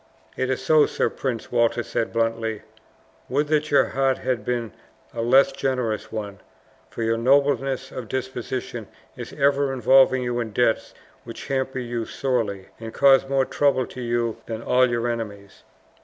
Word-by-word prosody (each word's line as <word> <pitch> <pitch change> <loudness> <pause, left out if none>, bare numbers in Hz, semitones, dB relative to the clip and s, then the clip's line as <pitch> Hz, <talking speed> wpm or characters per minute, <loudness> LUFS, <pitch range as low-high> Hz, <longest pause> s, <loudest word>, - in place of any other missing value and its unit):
"It 130 - -1
is 130 - -2
so, 155 -2 +5
Sir - - -1
Prince," 125 -4 -4
Walter 120 0 +2
said 115 - -2
bluntly. 115 -1 -1 0.7
"Would 145 +4 0
that 155 0 +1
your 140 - +4
heart 135 -1 +1
had 125 -5 -2
been 120 -2 -2 0.4
a 115 - -3
less 130 +4 +5
generous 125 -5 -2
one, 105 -3 -5 0.5
for 115 - -5
your 115 0 0
nobleness 135 0 +2
of 125 -3 -7
disposition 130 0 -4 0.3
is - - -8
ever 140 -1 +2
involving 130 +1 +4
you 120 0 -2
in 110 -3 -4
debts 115 0 +1 0.3
which - - -9
hamper 130 -1 -1
you 120 -2 -3
sorely, 110 -8 -2
and 115 0 -8
cause 135 -1 +5
more 135 -1 +2
trouble 135 -3 +1
to 125 - -9
you 120 -1 -1
than 115 0 -5
all 130 0 +3
your 120 0 -1
enemies!" 105 -4 -6
125 Hz, 160 wpm, -23 LUFS, 115-135 Hz, 0.7 s, so